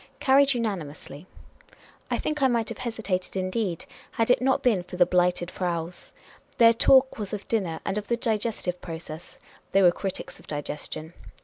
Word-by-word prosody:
Carried 275 0 +4
unanimously. 175 - -5 0.8
I - - 0
think 305 -1 -2
I 265 - +6
might 235 -3 0
have - - -7
hesitated, 220 -7 -3
indeed, 185 -1 -2 0.3
had 225 +1 +2
it 250 - +3
not 265 +1 +2
been 220 -7 +3
for 180 +1 -9
the 180 - +6
Blighted 180 0 +1
Fraus. 175 -1 -4 0.5
Their 230 -1 +7
talk 260 +2 +4
was 205 -1 -5
of 205 -1 -5
dinner 180 -8 -1
and 195 +1 0
of 210 - -10
the 235 - +1
digestive 215 -6 -1
pro 165 -2 -5
cess; 160 0 -10 0.4
they 195 0 +5
were 175 - +7
critics 190 +2 -5
of - - -18
digestion. 150 +2 -5
195 Hz, 175 wpm, -26 LUFS, 175-230 Hz, 0.8 s, Their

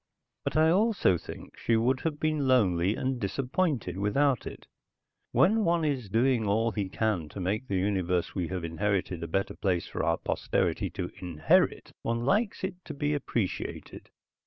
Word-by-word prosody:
But - - -1
I 160 +1 +5
also 200 - +3
think 85 - -9
she 115 - +1
would 125 +4 +2
have 150 -1 -3
been 155 -3 0
lonely 100 -6 +3
and 130 -1 -2
disappointed 125 - -1
without 130 +5 +1
it. - - -9 0.7
When 220 +4 +4
one 170 -3 +2
is 130 -8 -1
doing 120 +2 +2
all 110 +3 +2
he 100 -3 -2
can 95 -7 -1
to 100 - -8
make 105 +8 -2
the 95 - 0
universe 90 -2 0
we 90 -4 -2
have 90 -1 -4
inherited 90 +1 -1
a 85 - -3
better 95 +4 -1
place 90 -5 -1
for - - -4
our 85 - +2
posterity - - -1
to - - -5
inherit 80 -4 +2
one 115 +1 -1
likes 205 - +1
it 185 -1 -4
to 155 - -7
be 145 +1 0
appreciated. 120 -8 -3
115 Hz, 170 wpm, -29 LUFS, 95-145 Hz, 0.7 s, I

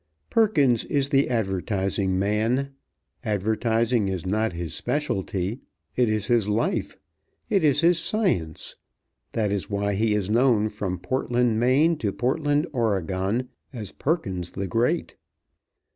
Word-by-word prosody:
Perkins 145 - +3
is 140 -1 +1
the 140 -2 +3
advertising 95 -3 0
man. 110 +8 0 0.5
Advertising 110 +1 +1
is 95 -3 -3
not 110 +4 0
his 85 -3 -5
specialty. 100 -6 -2 0.4
It 125 -3 +3
is 110 -1 0
his 115 -3 +2
life; 110 +3 -1 0.5
it 195 -4 +3
is 145 -1 +4
his 170 0 +4
science. 165 - -1 0.6
That 105 -3 0
is 100 -2 -2
why 100 0 0
he 105 +1 +1
is 100 -3 -1
known 115 -1 +3
from 100 -3 -3
Portland, 120 +2 0
Me., 140 +8 +4
to 105 -8 -1
Portland, 145 - 0
Oreg., 100 - 0 0.3
as 110 -7 -7
Perkins 95 - -2
the 95 - -4
Great. 120 - 0
110 Hz, 130 wpm, -25 LUFS, 100-130 Hz, 0.6 s, is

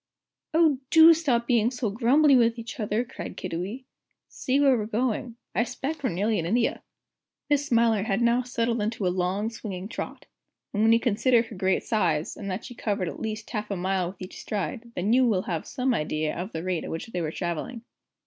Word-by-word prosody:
"Oh, 315 -5 +4
do 325 +1 +9
stop 265 -8 +1
being 235 -2 +3
so 245 -4 -2
grumbly 265 +6 +4
with 235 -1 +3
each 235 +4 -7
other," 215 +2 0
cried 250 - -8
Kiddiwee. 185 +8 -4 0.5
"See 265 +2 0
where 275 -2 +5
we're 215 -3 -2
going. 235 +1 -1 0.2
I - - +2
'spect 270 +5 -4
we're - - +2
nearly 205 +5 0
at 165 - -2
India." 230 +7 +1 0.7
Miss 290 0 +2
Smiler 230 -4 +3
had 200 0 0
now 235 +1 +3
settled 235 -2 -1
into 215 -1 -2
a 180 - +1
long, 190 +4 -1
swinging 195 -4 -6
trot. - - -6 0.5
And 205 - 0
when 225 +1 +5
you 230 - +5
consider 235 +1 +3
her 225 -2 -10
great 190 0 +1
size, 170 -8 0
and 200 - -6
that 190 +3 -4
she - - -8
covered 200 -6 -2
at - - -8
least 215 -1 -5
half 210 -3 -3
a 200 - -1
mile 185 0 0
at 190 - -10
each 185 +1 -9
stride, 230 +3 -4
you 235 +8 +3
will 195 -5 +1
then - - -5
have 165 -2 -3
some 255 0 0
idea 155 -4 -1
of 185 +5 -5
the 160 - -5
rate 185 -2 -1
at - - -6
which 165 - -4
they 180 -6 -4
were 160 - -1
travelling. 175 +8 -4
225 Hz, 210 wpm, -26 LUFS, 190-245 Hz, 0.7 s, do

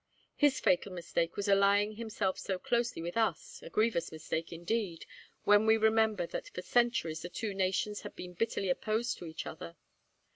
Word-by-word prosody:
His 290 -2 +3
fatal 185 +2 +2
mistake 170 -1 -2
was 205 0 -2
allying 200 +1 +4
himself 215 -4 -2
so 190 - -2
closely 235 -1 -1
with 175 +1 -4
us 225 -1 -1
a - - -9
grievous 215 -5 +1
mistake, 160 +1 -4
indeed, 175 +1 -2 0.4
when 205 +1 +5
we 220 0 +6
remember 220 -3 +3
that - - -6
for 180 - -4
centuries 235 -11 +1
the 175 - -6
two 210 +3 -3
nations 195 +2 0
had - - -9
been 180 0 -8
bitterly 195 0 -1
opposed 220 +5 -1
to 175 - -7
each 160 0 -6
other. 170 +1 -8
200 Hz, 175 wpm, -32 LUFS, 175-220 Hz, 0.4 s, we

